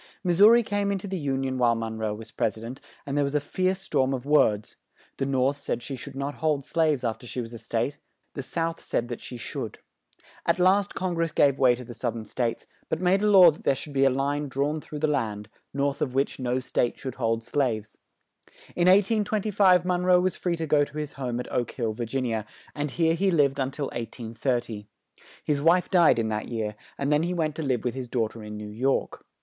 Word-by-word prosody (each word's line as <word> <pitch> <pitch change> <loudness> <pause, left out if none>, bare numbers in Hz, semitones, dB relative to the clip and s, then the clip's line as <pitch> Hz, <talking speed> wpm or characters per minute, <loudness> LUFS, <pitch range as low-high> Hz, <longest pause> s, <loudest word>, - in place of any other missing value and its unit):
Mis 175 -1 +1
sou 205 +2 +10
ri 235 +1 +6
came 205 -1 -1
in 200 - 0
to 195 - -7
the 190 - -3
Un 135 0 0
ion 130 -1 -2
while 120 -1 +4
Mon 115 -1 -4
roe 110 -1 -1
was 110 +1 -10
Pres 110 -1 -1
i - - -10
dent, 120 +4 -8 0.2
and 140 - -3
there 145 - +3
was 140 +1 -2
a - - +4
fierce 185 +5 -1
storm 135 -8 0
of 130 0 -7
words; 110 -8 +2 0.4
the 135 - -1
North 135 +1 +1
said 120 - -3
she 135 - -5
should 135 +2 -9
not 140 +1 -3
hold 150 -4 +1
slaves 155 -5 +1
after 120 +1 -3
she 125 - -5
was 115 -1 -5
a 115 - -7
State, 115 +5 -2 0.4
the 140 - -4
South 165 +4 -3
said 120 +1 -2
that 120 - -5
she 125 - -7
should. 115 - -5 0.7
At 170 - +2
last 190 +3 +3
Con 185 -2 -1
gress 165 -1 0
gave 140 -3 +3
way 125 -2 +5
to 125 - -9
the 120 - -9
South 120 0 -3
ern 110 -1 -6
States; 120 +1 -2 0.2
but 160 - -1
made 185 +2 +3
a 210 - +3
law 185 -4 +9
that 150 - -14
there 135 - +3
should 145 +2 -7
be 135 0 +3
a 135 - +6
line 140 +3 -1
drawn 145 +3 -1
through 150 - -8
the 150 - +1
land, 110 -8 -2 0.2
north 140 0 -1
of 130 -3 -1
which 135 0 0
no 125 0 0
State 120 -1 -1
should 130 -2 -5
hold 115 0 +1
slaves. 115 -6 -2 0.8
In 175 0 +2
1825 200 -2 +4
Mon 180 -1 0
roe 180 0 +5
was 185 +1 0
free 175 -2 -1
to 165 - -2
go 145 -1 +3
to 145 - -7
his 150 -1 -4
home 125 -3 -3
at 125 - -6
Oak 120 - 0
Hill, 115 -4 -2
Vir 120 +2 -4
gin 130 +3 -2
i 120 - -1
a, 105 - -8 0.3
and 145 0 -2
here 165 +4 +2
he 195 +4 +1
lived 145 -5 +2
un 130 -1 0
til 140 +1 -4
1830. 115 -1 -3 0.6
His 145 -2 0
wife 170 +4 +3
died 175 -8 +5
in 110 -1 0
that 105 -1 -3
year, 110 -3 -3 0.2
and 140 +1 +1
then 150 - +3
he 175 +2 -1
went 155 -3 0
to - - -2
live 130 -6 0
with 125 - -1
his 130 -1 -5
daugh 115 -3 0
ter 115 - -10
in 105 0 -7
New 105 0 -7
York. 130 +6 -1
140 Hz, 245 wpm, -26 LUFS, 120-165 Hz, 0.8 s, sou